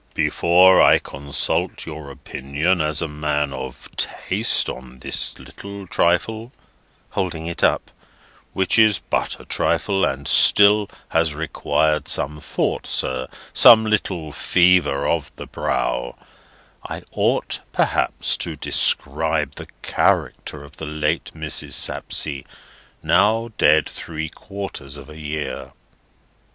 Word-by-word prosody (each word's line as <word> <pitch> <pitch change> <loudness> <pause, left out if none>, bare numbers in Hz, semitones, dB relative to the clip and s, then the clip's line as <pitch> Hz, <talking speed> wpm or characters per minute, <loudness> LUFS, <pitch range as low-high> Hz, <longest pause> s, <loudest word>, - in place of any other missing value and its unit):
"Before 85 +4 +4
I - - +6
consult 70 +1 -1
your 75 -2 -8
opinion 70 +6 -2
as 75 +1 -1
a - - -2
man 75 -1 -2
of 65 -1 -8
taste - - +1
on 65 0 -8
this - - -3
little 100 0 -10
trifle"—holding 90 -3 -3
it 85 0 -5
up—"which 95 +3 -2
is 110 -3 +5
but 85 - -2
a - - -13
trifle, 100 -1 0
and 70 +1 -1
still 105 0 +6 0.2
has 80 -2 +1
required 75 0 -1
some 75 +2 -1
thought, 75 - -2
sir, 65 -1 -1 0.3
some 110 -1 +8
little 95 -7 -1
fever 85 -5 +2
of 80 -3 -1
the - - -8
brow, - - -2 0.7
I - - -7
ought - - 0
perhaps 65 - 0
to - - -3
describe - - 0
the - - -10 0.2
character 75 -2 0
of 70 - -15
the - - -6
late 75 0 -2
Mrs. 80 -2 -2
Sapsea, 70 -3 0 0.6
now 110 +5 +2
dead 75 -2 +4
three 80 -1 -6
quarters 95 -8 -8
of 70 +2 -12
a 75 - -11
year." 75 0 -5
80 Hz, 120 wpm, -21 LUFS, 75-95 Hz, 0.7 s, some